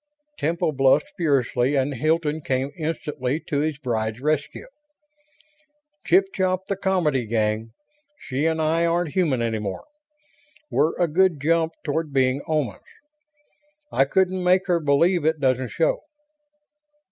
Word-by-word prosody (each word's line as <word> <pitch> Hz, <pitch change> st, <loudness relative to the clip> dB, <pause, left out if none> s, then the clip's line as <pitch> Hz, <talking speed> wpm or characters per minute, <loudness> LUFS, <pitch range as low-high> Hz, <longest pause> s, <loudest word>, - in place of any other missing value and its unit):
Temple 160 Hz, +1 st, 0 dB
blushed 135 Hz, +6 st, +2 dB
furiously 140 Hz, -, +1 dB
and 140 Hz, +1 st, +1 dB
Hilton 155 Hz, +3 st, 0 dB
came 135 Hz, 0 st, -1 dB
instantly 150 Hz, -4 st, -3 dB
to 145 Hz, -, -2 dB
his 155 Hz, -1 st, -1 dB
bride's 110 Hz, -5 st, -2 dB
rescue. 150 Hz, -, -2 dB, 1.4 s
"Chip 380 Hz, +2 st, +4 dB
chop 185 Hz, 0 st, 0 dB
the 195 Hz, -, -2 dB
comedy, 170 Hz, -, 0 dB
gang. 110 Hz, 0 st, -1 dB, 0.4 s
She 145 Hz, -, -2 dB
and 160 Hz, 0 st, 0 dB
I 160 Hz, +2 st, +1 dB
aren't 170 Hz, -2 st, 0 dB
human 150 Hz, -10 st, +1 dB
any 110 Hz, -1 st, -1 dB
more. 100 Hz, -, -5 dB, 0.9 s
We're 155 Hz, +3 st, +1 dB
a 175 Hz, -, +3 dB
good 175 Hz, 0 st, +2 dB
jump 165 Hz, +2 st, +1 dB
toward 155 Hz, +1 st, -2 dB
being 130 Hz, 0 st, +1 dB
Omans. 150 Hz, -11 st, -1 dB, 1.1 s
I 135 Hz, -, +3 dB
couldn't 185 Hz, +3 st, +1 dB
make 185 Hz, +2 st, +3 dB
her 175 Hz, -3 st, +2 dB
believe 165 Hz, +4 st, +2 dB
it 160 Hz, 0 st, +1 dB
doesn't 130 Hz, -2 st, +1 dB
show." 165 Hz, -, +1 dB
150 Hz, 135 wpm, -23 LUFS, 130-170 Hz, 1.4 s, Chip